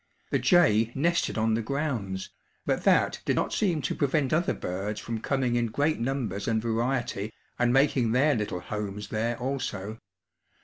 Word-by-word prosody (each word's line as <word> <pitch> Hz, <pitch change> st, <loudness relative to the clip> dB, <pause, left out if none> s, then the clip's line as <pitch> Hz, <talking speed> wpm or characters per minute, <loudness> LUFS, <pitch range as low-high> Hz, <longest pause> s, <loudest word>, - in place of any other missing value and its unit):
The -, -, +2 dB
jay 115 Hz, -, +4 dB
nested 170 Hz, +1 st, +1 dB
on 110 Hz, 0 st, +2 dB
the 115 Hz, -, +1 dB
grounds, 115 Hz, -8 st, -3 dB, 0.3 s
but -, -, -1 dB
that -, -, +3 dB
did -, -, +1 dB
not -, -, 0 dB
seem 170 Hz, -8 st, +1 dB
to -, -, -1 dB
prevent 140 Hz, -1 st, +1 dB
other 170 Hz, +3 st, +1 dB
birds 100 Hz, +4 st, -4 dB
from 115 Hz, -1 st, -4 dB
coming 130 Hz, -3 st, 0 dB
in 120 Hz, -1 st, +1 dB
great 145 Hz, +7 st, 0 dB
numbers 115 Hz, -6 st, -2 dB
and 110 Hz, -1 st, +2 dB
variety 115 Hz, -2 st, -1 dB, 0.3 s
and 120 Hz, -1 st, +3 dB
making 135 Hz, -3 st, +3 dB
their 140 Hz, +5 st, +4 dB
little 105 Hz, -6 st, -2 dB
homes 105 Hz, 0 st, -5 dB
there 115 Hz, +2 st, -1 dB
also. 115 Hz, -5 st, -4 dB
120 Hz, 165 wpm, -27 LUFS, 110-140 Hz, 0.3 s, jay